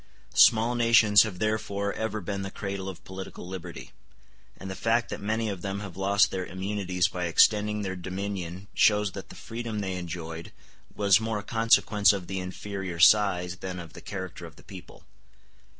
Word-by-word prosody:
Small 115 Hz, +2 st, +5 dB
nations 115 Hz, -3 st, +6 dB
have 105 Hz, -5 st, -1 dB
therefore 100 Hz, -1 st, -1 dB
ever 110 Hz, -1 st, -3 dB
been 100 Hz, +1 st, -4 dB
the 95 Hz, -, -4 dB
cradle 100 Hz, -1 st, -5 dB
of 90 Hz, -1 st, -10 dB
political 95 Hz, -1 st, -8 dB
liberty; 90 Hz, -2 st, -8 dB, 0.7 s
and 95 Hz, -, -8 dB
the 95 Hz, -, -4 dB
fact 115 Hz, +3 st, +1 dB
that -, -, -5 dB
many 110 Hz, +2 st, -1 dB
of 100 Hz, -4 st, -4 dB
them 100 Hz, +1 st, -4 dB
have 100 Hz, -4 st, -8 dB
lost 100 Hz, +1 st, +3 dB
their 95 Hz, -1 st, -2 dB
immunities 95 Hz, -1 st, -1 dB
by 90 Hz, -2 st, -4 dB
extending 105 Hz, +5 st, +3 dB
their 95 Hz, -1 st, -3 dB
dominion 95 Hz, 0 st, -5 dB
shows 105 Hz, -2 st, +3 dB
that 95 Hz, -, -9 dB
the -, -, -11 dB
freedom 115 Hz, -1 st, -6 dB
they 95 Hz, -3 st, -3 dB
enjoyed 85 Hz, -1 st, -6 dB, 0.4 s
was 100 Hz, -1 st, +4 dB
more 110 Hz, -1 st, -2 dB
a 105 Hz, -, -5 dB
consequence 110 Hz, -2 st, +3 dB
of 95 Hz, -3 st, -4 dB
the 95 Hz, +1 st, -4 dB
inferior 95 Hz, -1 st, -5 dB
size 90 Hz, -1 st, +4 dB
than 90 Hz, -1 st, -6 dB
of 85 Hz, -2 st, -9 dB
the -, -, -11 dB
character 95 Hz, -3 st, -7 dB
of 80 Hz, -, -15 dB
the -, -, -17 dB
people. 95 Hz, -3 st, -12 dB
100 Hz, 180 wpm, -27 LUFS, 90-105 Hz, 0.7 s, nations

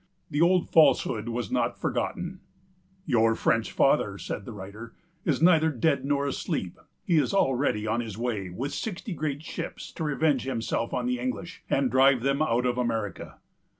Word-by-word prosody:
The 145 Hz, -, 0 dB
old 180 Hz, +1 st, +4 dB
falsehood 120 Hz, -7 st, +4 dB
was 115 Hz, -3 st, -3 dB
not -, -, 0 dB
forgotten: 180 Hz, +1 st, -2 dB, 0.7 s
"Your 115 Hz, -5 st, +3 dB
French 115 Hz, -1 st, +1 dB
Father," -, -, +2 dB
said 100 Hz, -, -5 dB
the -, -, -7 dB
writer, 105 Hz, +3 st, -9 dB, 0.3 s
"is 150 Hz, -1 st, +1 dB
neither 160 Hz, -2 st, +5 dB
dead 140 Hz, 0 st, +1 dB
nor 140 Hz, 0 st, +1 dB
asleep; 140 Hz, -, -3 dB, 0.3 s
he 170 Hz, -, +3 dB
is 195 Hz, -, 0 dB
already 130 Hz, -, +1 dB
on 110 Hz, +2 st, 0 dB
his 110 Hz, -4 st, -5 dB
way, 110 Hz, -6 st, -2 dB
with 135 Hz, +11 st, -4 dB
sixty 200 Hz, -, -4 dB
great 150 Hz, -1 st, -3 dB
ships, -, -, -6 dB
to 165 Hz, -, -5 dB
revenge 150 Hz, -2 st, +1 dB
himself 115 Hz, -2 st, -2 dB
on 125 Hz, -, -1 dB
the 125 Hz, 0 st, 0 dB
English, 130 Hz, +7 st, -4 dB
and 135 Hz, -2 st, +1 dB
drive 130 Hz, -1 st, +4 dB
them 140 Hz, +2 st, +1 dB
out 125 Hz, -5 st, +1 dB
of 125 Hz, 0 st, 0 dB
America." 115 Hz, -4 st, -3 dB
130 Hz, 170 wpm, -27 LUFS, 115-155 Hz, 0.7 s, neither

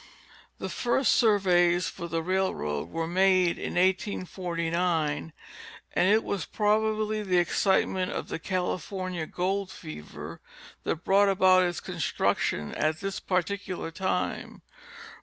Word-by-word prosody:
The -, -, -4 dB
first 245 Hz, 0 st, +1 dB
surveys 180 Hz, -5 st, +3 dB
for 170 Hz, -, -6 dB
the 165 Hz, 0 st, -2 dB
railroad 85 Hz, -, -1 dB
were 165 Hz, -, -2 dB
made 185 Hz, 0 st, +3 dB
in -, -, -4 dB
1849, 175 Hz, -4 st, 0 dB, 0.6 s
and 180 Hz, +2 st, +3 dB
it 220 Hz, +2 st, +4 dB
was 195 Hz, -5 st, -2 dB
probably 215 Hz, 0 st, +1 dB
the 185 Hz, -3 st, +1 dB
excitement 185 Hz, +1 st, +2 dB
of -, -, -4 dB
the -, -, -4 dB
California 185 Hz, -1 st, -3 dB
gold 190 Hz, +2 st, -1 dB
fever 75 Hz, -, -9 dB, 0.4 s
that 165 Hz, -, -2 dB
brought 200 Hz, +1 st, +4 dB
about 185 Hz, -1 st, +5 dB
its 175 Hz, -1 st, -2 dB
construction 75 Hz, -, -1 dB
at 155 Hz, 0 st, 0 dB
this 195 Hz, 0 st, -3 dB
particular 185 Hz, -1 st, -2 dB
time. 185 Hz, +3 st, -3 dB
185 Hz, 120 wpm, -28 LUFS, 165-195 Hz, 0.6 s, about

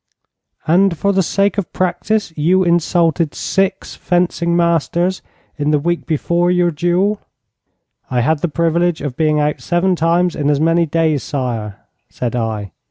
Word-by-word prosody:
'And 175 Hz, +2 st, +3 dB
for 200 Hz, +4 st, +1 dB
the 190 Hz, -, +2 dB
sake 200 Hz, +3 st, 0 dB
of 195 Hz, -, -5 dB
practice 185 Hz, 0 st, -1 dB
you 180 Hz, +5 st, +2 dB
insulted 170 Hz, -2 st, +1 dB
six 195 Hz, 0 st, -1 dB
fencing 175 Hz, -1 st, 0 dB
masters 170 Hz, +2 st, 0 dB, 0.4 s
in 145 Hz, 0 st, -1 dB
the 150 Hz, -, +3 dB
week 175 Hz, +4 st, -2 dB
before 170 Hz, +3 st, 0 dB
your 180 Hz, -1 st, +2 dB
duel?' 175 Hz, +6 st, 0 dB, 0.9 s
'I 125 Hz, -1 st, 0 dB
had 155 Hz, +5 st, +1 dB
the 175 Hz, -, -1 dB
privilege 170 Hz, +1 st, 0 dB
of 140 Hz, -4 st, -4 dB
being 155 Hz, 0 st, +1 dB
out 150 Hz, 0 st, -1 dB
seven 180 Hz, +2 st, +1 dB
times 170 Hz, +1 st, +1 dB
in 145 Hz, -1 st, -1 dB
as 145 Hz, -1 st, +2 dB
many 165 Hz, +1 st, +2 dB
days, 155 Hz, -2 st, +1 dB
sire,' 120 Hz, -7 st, -4 dB, 0.3 s
said 125 Hz, -1 st, -4 dB
I. 110 Hz, -4 st, -3 dB
170 Hz, 155 wpm, -17 LUFS, 150-180 Hz, 0.9 s, And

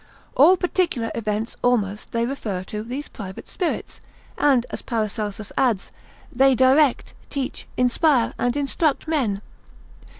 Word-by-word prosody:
All 340 Hz, +8 st, +7 dB
particular 345 Hz, -11 st, 0 dB
events 215 Hz, 0 st, -2 dB
almost 210 Hz, -5 st, 0 dB
they 230 Hz, 0 st, 0 dB
refer 215 Hz, -8 st, -3 dB
to 210 Hz, +2 st, -5 dB
these 255 Hz, +6 st, -5 dB
private 190 Hz, -3 st, -9 dB
spirits; 360 Hz, -, -3 dB, 0.3 s
and 265 Hz, -5 st, +3 dB
(as -, -, -5 dB
Paracelsus 215 Hz, -2 st, -3 dB
adds) 230 Hz, -7 st, +1 dB, 0.4 s
they 265 Hz, +1 st, +5 dB
direct, 260 Hz, +2 st, +3 dB, 0.2 s
teach, 275 Hz, -2 st, -4 dB
inspire, 250 Hz, +1 st, +3 dB
and 245 Hz, +2 st, 0 dB
instruct 285 Hz, +2 st, 0 dB
men. 235 Hz, -11 st, 0 dB
245 Hz, 125 wpm, -23 LUFS, 215-280 Hz, 0.4 s, All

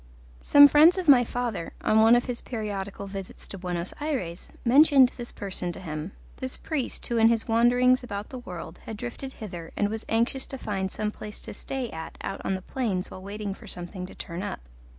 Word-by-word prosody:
Some 285 Hz, 0 st, +9 dB
friends 310 Hz, +6 st, +6 dB
of 370 Hz, -2 st, -2 dB
my 260 Hz, -4 st, +8 dB
father, 235 Hz, -8 st, -3 dB
on 215 Hz, -, +3 dB
one 225 Hz, +2 st, +7 dB
of 240 Hz, -, +2 dB
his 245 Hz, -2 st, -3 dB
periodical 200 Hz, -4 st, -4 dB
visits 195 Hz, -1 st, -7 dB
to 195 Hz, -, -7 dB
Buenos 175 Hz, -1 st, -3 dB
Ayres, 245 Hz, -, -3 dB
mentioned 270 Hz, 0 st, +7 dB
this 240 Hz, -1 st, -7 dB
person 185 Hz, -3 st, -4 dB
to -, -, -8 dB
him 160 Hz, +1 st, -5 dB, 0.2 s
this 260 Hz, -1 st, -4 dB
priest 295 Hz, -6 st, -3 dB
who 235 Hz, -, 0 dB
in 225 Hz, 0 st, +6 dB
his 230 Hz, -1 st, +1 dB
wanderings 245 Hz, +2 st, +4 dB
about 205 Hz, -3 st, -5 dB
the 255 Hz, -, -7 dB
world 175 Hz, -6 st, -8 dB
had 220 Hz, -, -5 dB
drifted 245 Hz, +3 st, -6 dB
hither 175 Hz, -6 st, -8 dB
and 205 Hz, -, +2 dB
was 220 Hz, +1 st, -4 dB
anxious 235 Hz, +4 st, +1 dB
to 270 Hz, -, -6 dB
find 195 Hz, -5 st, -2 dB
some 210 Hz, 0 st, -2 dB
place 210 Hz, 0 st, -9 dB
to -, -, -8 dB
stay 260 Hz, +3 st, -4 dB
at 160 Hz, 0 st, -7 dB
out 195 Hz, -, -4 dB
on 190 Hz, -, 0 dB
the 185 Hz, -, -6 dB
plains 205 Hz, -9 st, -2 dB
while 185 Hz, -, -8 dB
waiting 200 Hz, +1 st, -5 dB
for 215 Hz, +2 st, -13 dB
something 180 Hz, 0 st, -6 dB
to -, -, -13 dB
turn 170 Hz, +1 st, -6 dB
up. 200 Hz, -, -4 dB
215 Hz, 210 wpm, -27 LUFS, 190-245 Hz, 0.2 s, Some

